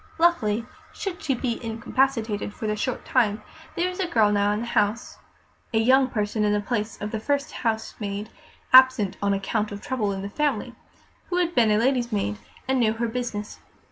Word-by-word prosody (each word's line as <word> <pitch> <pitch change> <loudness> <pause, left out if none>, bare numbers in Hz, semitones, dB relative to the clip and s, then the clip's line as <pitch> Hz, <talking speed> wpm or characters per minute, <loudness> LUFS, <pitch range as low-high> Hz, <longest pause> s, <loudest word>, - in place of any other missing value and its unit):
Luckily, 240 -11 +2 0.3
should 375 -3 -5
she 270 - 0
be 240 -1 -3
incapacitated 225 -2 -1
for - - -6
a 210 0 0
short 240 +4 -3
time, 215 -4 +1 0.3
there 350 - +1
was 365 +1 -6
a 375 - 0
girl 220 -9 +3
now 205 0 +2
in 210 +1 -1
the - - -3
house 220 0 -1 0.6
(a - - +4
young 260 +4 +5
person 210 -2 -1
in 210 0 +2
the 210 - +2
place 215 0 -3
of 210 +1 -4
the 220 - -2
first 285 +5 -1
housemaid, 220 -2 -3 0.4
absent 255 -6 +7
on 200 0 +1
account 210 +2 -1
of 200 - -6
trouble 240 -5 -1
in 195 0 -4
the 200 - -4
family) 295 +4 -1 0.6
who 355 - 0
had 350 -1 +1
been 235 -7 +4
lady's 245 +1 +1
maid 105 - -1 0.3
and 265 0 +2
knew 220 -2 +3
her 235 +1 -1
business. 225 -3 -4
225 Hz, 190 wpm, -25 LUFS, 210-260 Hz, 0.6 s, absent